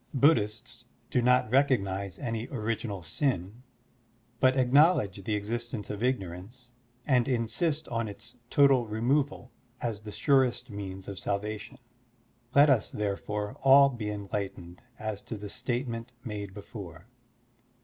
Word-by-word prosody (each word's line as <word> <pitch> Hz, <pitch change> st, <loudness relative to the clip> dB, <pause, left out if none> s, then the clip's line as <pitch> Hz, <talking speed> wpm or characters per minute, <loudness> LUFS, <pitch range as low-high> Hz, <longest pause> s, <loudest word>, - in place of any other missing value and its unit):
Buddhists 120 Hz, -3 st, +2 dB, 0.3 s
do 125 Hz, -, +2 dB
not 125 Hz, -2 st, +3 dB
recognize 100 Hz, -, +1 dB
any 115 Hz, 0 st, -3 dB
original 110 Hz, -5 st, -3 dB
sin, 100 Hz, -, -2 dB, 0.8 s
but 130 Hz, 0 st, +4 dB
acknowledge 130 Hz, -, +4 dB
the 105 Hz, +2 st, -1 dB
existence 110 Hz, +1 st, -4 dB
of 105 Hz, 0 st, -5 dB
ignorance, 120 Hz, +1 st, -3 dB, 0.3 s
and 125 Hz, -4 st, +3 dB
insist 140 Hz, +6 st, 0 dB
on 115 Hz, -2 st, -1 dB
its 115 Hz, +4 st, -10 dB
total 135 Hz, -4 st, +5 dB
removal 125 Hz, +4 st, 0 dB, 0.3 s
as 110 Hz, -4 st, -3 dB
the 105 Hz, -1 st, -8 dB
surest 130 Hz, -1 st, +2 dB
means 95 Hz, -2 st, -6 dB
of 100 Hz, -2 st, -6 dB
salvation. 105 Hz, +5 st, -3 dB, 0.8 s
Let 145 Hz, +2 st, +8 dB
us, 130 Hz, -7 st, +3 dB
therefore, 105 Hz, 0 st, -3 dB
all 140 Hz, +1 st, +7 dB
be 120 Hz, -5 st, -5 dB
enlight 100 Hz, -1 st, -3 dB
ened 85 Hz, +1 st, -12 dB, 0.2 s
as 110 Hz, -2 st, -4 dB
to 115 Hz, -, -6 dB
the 105 Hz, 0 st, -7 dB
statement 120 Hz, -1 st, -3 dB
made 105 Hz, -3 st, -5 dB
before. 95 Hz, -5 st, -9 dB
115 Hz, 130 wpm, -29 LUFS, 100-125 Hz, 0.8 s, Let